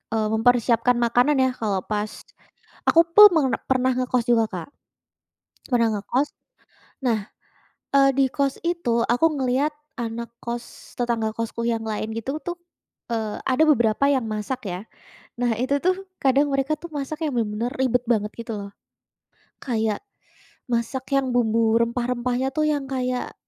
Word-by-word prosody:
eee, 215 -1 +1
mempersiapkan 235 +1 +3
makanan 245 +4 +3
ya. 260 - +3
Kalau 200 -4 0
pas 210 0 -2 0.8
aku 330 - +7
pun 420 0 +12 0.2
per - - +1
pernah 260 0 +3
ngekos 250 -1 0
juga, 235 -2 +4
Kak, 180 -3 -5 1.1
pernah 235 -2 +4
ngekos. 260 +8 0 0.8
Nah, 230 -3 +2 0.8
eee, 275 0 +6
di 275 - +5
kos 275 +1 -1
itu 340 -9 0
aku 245 +7 +3
ngelihat 265 +4 +1 0.2
anak 235 -1 -4
kos 235 0 -7
tetangga 230 -3 -1
kosku 230 +1 -4
yang 230 -1 0
lain 220 0 -3
gitu 260 +6 -3
tuh, 345 +3 -5 0.6
eee, 220 -2 -3
ada 260 +5 +3
beberapa 235 -4 +3
yang 275 -4 +2
masak 215 +2 -4
ya. 180 +1 -4 0.6
Nah, 240 -1 +2
itu 260 +4 +1
tuh 370 +1 +2 0.3
kadang 275 +2 +3
mereka 275 +2 +1
tuh 340 +3 -9
masak 300 +3 -3
yang 295 - -2
benar-benar 225 +1 -1
ribet 250 -1 +2
banget 215 -3 +1
gitu 230 -1 -5
loh. 200 0 -8 0.9
Kayak 220 -4 -1 0.7
masak 235 +3 -1
yang 265 -2 +1
bumbu 225 -2 +2
rempah-rempahnya 245 +2 0
tuh 310 - +1
yang 290 -2 -1
kayak, 255 -1 -2
245 Hz, 145 wpm, -23 LUFS, 225-270 Hz, 1.1 s, pun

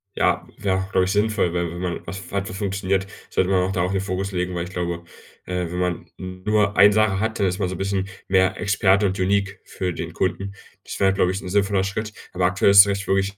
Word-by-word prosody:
Ja, - - +1
wäre 95 -2 0
auch, 95 +1 -5
glaube 90 - +3
ich, 95 - -1
sinnvoll, 105 -4 +1
weil 85 -1 -1
wenn 85 - -7
man 90 -1 -3
was 95 +3 -8
hat, 100 -1 -1
was 95 - -6
funktioniert, 95 -1 -1 0.2
sollte 95 - +1
man 95 -1 +3
auch 95 - -1
darauf 90 0 0
den 95 - 0
Fokus 95 0 -3
legen, 90 0 -2
weil 85 0 -2
ich - - -9
glaube, 85 -1 -3 0.4
äh, 90 -1 -2
wenn 90 - -3
man 90 -1 -1
nur 100 +3 -1
eine 100 +1 +7
Sache 105 -2 +2
hat, 110 -1 -2
dann 100 - +3
ist 90 +2 -2
man 95 -2 0
so 95 - -4
'n - - -7
bisschen 95 0 -2 0.2
mehr 95 0 +2
Experte 100 0 +3
und 95 0 0
unique 100 +1 0
für 90 -2 -4
den 85 0 -5
Kunden. 95 +3 -2 0.3
Das - - -7
wäre, 95 -1 +4
glaube 90 -2 +2
ich, 95 - -4
'n - - -8
sinnvoller 100 0 +1
Schritt. 105 +2 -3 0.2
Aber 90 0 +1
aktuell 100 +2 +3
ist 100 0 +10
echt 100 0 -2
wirklich, 95 +1 0
95 Hz, 245 wpm, -22 LUFS, 90-100 Hz, 0.4 s, ist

